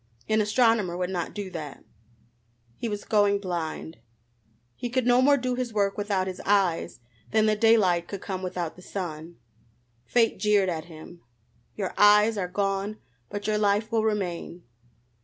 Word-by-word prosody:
An 215 0 +2
astronomer 210 -4 +2
would 180 0 -2
not 175 -3 -3
do 200 -3 -5
that. 155 -5 -7 0.9
He 230 - -4
was 205 -1 -4
going 205 -1 +3
blind. 170 -4 -5 0.8
He 245 - -4
could 255 0 0
no 245 +1 +5
more 285 +2 +5
do 255 -1 -2
his 245 -2 -3
work 200 -1 +1
without 200 -2 -1
his 185 -1 -6
eyes 190 -10 +1 0.3
than 220 0 +3
the 215 0 +3
daylight 205 -6 +3
could 200 - -6
come 185 -1 -5
without 180 -3 -4
the 180 - -14
sun. 170 -3 -6 0.7
Fate 230 -2 +2
jeered 205 -3 +3
at 160 -2 -3
him: 170 +1 -12 0.5
"Your 195 -3 -3
eyes 210 +2 +6
are 190 -3 -2
gone, 195 +2 -2 0.3
but 205 0 -5
your 215 0 +1
life 210 +1 +1
will 225 -1 +1
remain." 180 -5 -3
200 Hz, 160 wpm, -26 LUFS, 180-215 Hz, 0.9 s, eyes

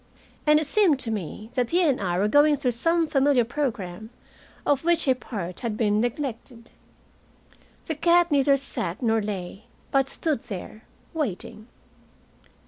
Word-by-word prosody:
And 300 0 +6
it 310 - -2
seemed 350 -2 +3
to 230 - -2
me 210 +2 -5
that 245 -2 0
he 355 +2 +3
and 280 -8 +2
I 175 -2 -1
were 200 +3 +2
going 290 +5 +5
through 255 -3 0
some 330 +8 +1
familiar 275 -4 +3
program, 220 -7 -4 0.6
of 285 -1 +1
which 335 -2 +2
a 260 - +5
part 195 -8 -6
had 225 -3 -3
been 210 -2 +2
neglected. 240 -1 -4 1.1
The 320 - -2
cat 345 +2 +3
neither 275 -1 +4
sat 220 -8 -5
nor 225 -1 +2
lay, 195 -1 -6 0.3
but 270 -1 +2
stood 305 -8 -1
there, 215 0 -8 0.3
waiting. 220 - -4
250 Hz, 150 wpm, -25 LUFS, 215-295 Hz, 1.1 s, And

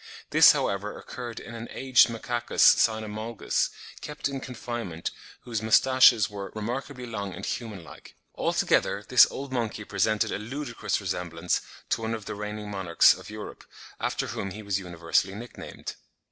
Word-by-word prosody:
This, - - +8
however, 100 +1 -2
occurred 120 -2 -7
in 120 - -10
an 115 0 -6
aged 130 -1 +4
Macacus 120 +1 -2
cynomolgus, 110 0 +2 0.3
kept 150 -1 -3
in 140 -1 -4
confinement 120 -9 -5 0.3
whose 115 -3 -3
moustaches 120 -1 +6
were 100 -1 -7
"remarkably 125 +4 -4
long 100 -5 -5
and 95 - -6
human 110 -7 -4
like." - - -14 0.2
Altogether - - +1
this - - +8
old 135 -1 -6
monkey 115 -4 -2
presented 110 +1 +1
a - - -2
ludicrous 140 +8 -3
resemblance 85 -1 -2 0.3
to - - 0
one 115 0 -1
of 110 -2 -8
the - - -4
reigning 105 0 -5
monarchs 95 -4 +5
of - - -11
Europe, 105 0 -8 0.4
after - - -1
whom 100 - -4
he 105 +3 -8
was 100 -1 -1
universally 90 +1 0
nick 120 +3 -9
named. - - -7
110 Hz, 155 wpm, -27 LUFS, 100-120 Hz, 0.4 s, This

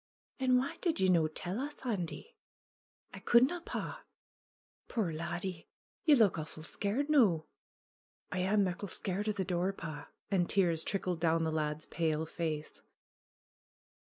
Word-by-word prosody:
"And 255 -1 +4
wha' 260 +2 -1
did 335 - 0
ye 190 -1 +3
no' 165 -3 +4
tell 175 +6 -4
us, 285 0 -5
Andy 215 - -3 0.4
?" - - -43
'T - - -7
coudna, 260 +9 +4
pa." - - -5 0.9
"Puir 205 -9 -1
laddie! 170 +2 -4 0.4
Ye 305 -3 +7
look 210 -9 +4
awfu' 155 0 -7
scared 210 - 0
noo 220 - +4 0.9
I" 185 - -1
"I 185 +2 +1
am 210 -1 +4
muckle 190 +2 -2
scared 195 +4 -2
of 210 - 0
the 190 - -1
door, 180 +2 0
pa." 155 -5 -7 0.2
And 180 -3 +2
tears 170 -5 +2
trickled 185 -3 -1
down 165 0 +2
the 160 - 0
lad's 155 -1 -1
pale 160 -2 0
face. 155 -2 -4
180 Hz, 155 wpm, -33 LUFS, 165-215 Hz, 0.9 s, Ye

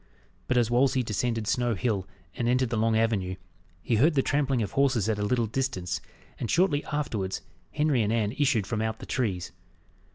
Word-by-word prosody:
But 125 - +1
as 120 -1 +2
Wolsey 130 +1 +3
descended 115 0 -1
Snow 120 +1 +1
Hill, 100 -3 -1 0.3
and 120 - 0
entered 125 -1 +2
the - - 0
long 110 0 +2
avenue, 105 -5 0 0.5
he 115 - +1
heard 150 +7 +4
the 135 - +3
trampling 135 -4 +1
of 100 - -4
horses 130 -6 +2
at 110 -2 0
a - - 0
little 120 +2 +1
distance, 105 -7 -2 0.4
and 120 - -3
shortly 160 - +2
afterwards, 110 -11 -2 0.3
Henry 150 -5 +2
and 105 0 +1
Anne 110 -3 +1
issued 130 -6 +1
from 110 +1 -2
out 110 0 -1
the - - -9
trees. 100 -9 -2
115 Hz, 190 wpm, -27 LUFS, 105-130 Hz, 0.5 s, heard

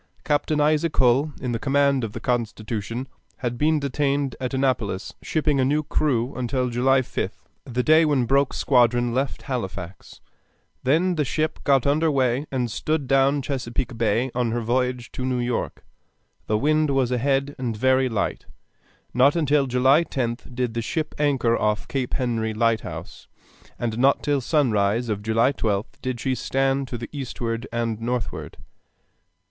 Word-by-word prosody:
Captain 150 +1 +1
Isaac 155 +2 +2
Hull, 135 +4 +3
in 125 -2 -3
command 140 -1 +2
of 110 -2 -4
the - - -5
Constitution, 115 0 -3 0.3
had 120 -1 -3
been 155 +4 +2
detained 140 0 -1
at 125 - -2
Annapolis 125 -8 -1
shipping 150 -3 0
a - - +4
new 150 +4 +1
crew 135 -4 0
until 125 0 -1
July 130 +3 +3
5th, 125 - -5 0.2
the 125 0 -1
day 155 +3 +6
when 145 -5 +2
Broke's 135 +3 +2
squadron 120 -2 +3
left 135 +2 -2
Halifax; 95 -8 -6 0.6
then 165 +8 +2
the 150 - +2
ship 155 +3 -1
got 135 -3 +3
under 155 +3 +2
way 135 0 +1
and 125 -4 -1
stood 155 +5 -1
down 135 +1 +3
Chesapeake 125 -1 -3
Bay 115 +3 +1
on 120 -1 0
her 120 +1 -1
voyage 125 +1 -1
to 130 - -5
New 130 -1 0
York. 120 0 -3 0.6
The 105 - +2
wind 155 +4 +2
was 135 -3 +1
ahead 135 +3 +1
and 120 -4 -2
very 130 +2 +3
light. 110 - -2 0.7
Not 135 +5 +4
until 145 -4 +2
July 130 +5 +4
10th 125 -4 -4
did 125 -2 -1
the 115 - -2
ship 155 +6 -3
anchor 135 -6 +2
off 105 -2 0
Cape 130 -3 -2
Henry 115 -4 -1
lighthouse, 115 -1 -2 0.5
and 115 -1 -3
not 135 +2 +3
till 145 -2 +1
sunrise 115 -5 +1
of 105 -2 -2
July 110 +4 +2
12th 110 +3 -2
did 130 -2 -3
she 130 +2 0
stand 135 +1 0
to 125 - -5
the 115 - -7
eastward 120 -3 -4
and 115 -2 -2
northward. 120 -1 -3
130 Hz, 160 wpm, -24 LUFS, 120-140 Hz, 0.7 s, day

